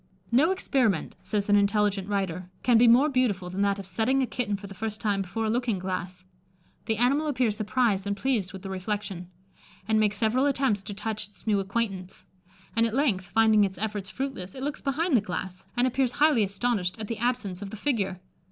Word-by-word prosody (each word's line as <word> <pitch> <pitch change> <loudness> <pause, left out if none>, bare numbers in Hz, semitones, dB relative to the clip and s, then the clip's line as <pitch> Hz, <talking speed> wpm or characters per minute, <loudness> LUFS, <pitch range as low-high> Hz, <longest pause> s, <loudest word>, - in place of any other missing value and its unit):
"No 275 +8 +5
experiment," 255 - +1
says 205 -2 -1
an 205 - +4
intelligent 200 -1 +2
writer, 185 -3 -2
"can 245 - +4
be 240 - +6
more 245 +6 +6
beautiful 220 -10 0
than 190 +2 -2
that 200 0 +2
of 200 - -7
setting 225 +9 +1
a - - +2
kitten 230 -5 -2
for 200 - -10
the 195 - -8
first 215 +1 -4
time 205 -2 0
before 220 +4 -3
a - - 0
looking 240 -3 0
glass. 185 0 -4 0.6
The 220 - 0
animal 275 +6 +2
appears 250 -7 +1
surprised 210 -2 +1
and 200 0 -1
pleased 220 -5 0
with 190 -1 -9
the 195 - -5
reflection, 190 -2 -4 0.6
and 220 0 +3
makes 210 -1 +2
several 240 +5 +2
attempts 265 -7 +1
to 200 +1 -7
touch 210 +1 -3
its 200 -4 -17
new 210 -3 +2
acquaintance; 195 -2 -3 0.5
and 230 0 +3
at 225 - -4
length, 230 -10 +1
finding 220 +2 +4
its 190 -2 -1
efforts 205 -2 -3
fruitless, 260 -9 -5
it 260 - -6
looks 290 +1 -3
behind 295 +3 +1
the 230 - +5
glass, 185 -1 -6
and 245 - +4
appears 255 -1 +1
highly 295 -6 +4
astonished 200 -1 -1
at 215 - -5
the 230 -1 -4
absence 220 -6 -1
of 200 - -5
the 220 - -8
figure. 200 -7 -1
210 Hz, 205 wpm, -27 LUFS, 195-245 Hz, 0.6 s, be